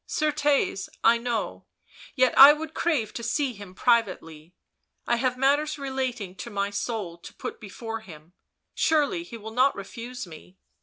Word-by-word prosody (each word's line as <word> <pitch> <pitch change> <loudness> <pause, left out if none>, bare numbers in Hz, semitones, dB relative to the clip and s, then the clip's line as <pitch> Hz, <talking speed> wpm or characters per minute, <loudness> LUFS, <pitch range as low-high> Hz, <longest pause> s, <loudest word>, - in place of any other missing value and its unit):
" - - -57
Certes, 295 -8 0
I 230 +1 +5
know, 235 -1 -3 0.5
yet 255 -2 +3
I 275 - +12
w 300 +1 +5
r - - -2
ould 310 - -23
crave 285 -11 0
to - - -5
see 255 +3 -1
him 200 -3 -11
privately, 180 -9 0 0.5
I 235 - +1
have 250 +1 0
matters 290 +4 +2
relating 260 -8 -3
to 235 - -7
my 200 -2 -2
soul 200 -5 -4
to - - -12
put - - -6
before 225 +2 -6
him, 170 -5 -14 0.4
surely 320 +2 +2
he 260 -9 -9
will 220 0 -9
not 260 +4 +3
refuse 235 +5 -7
me." 175 +2 -14
235 Hz, 170 wpm, -26 LUFS, 200-275 Hz, 0.5 s, I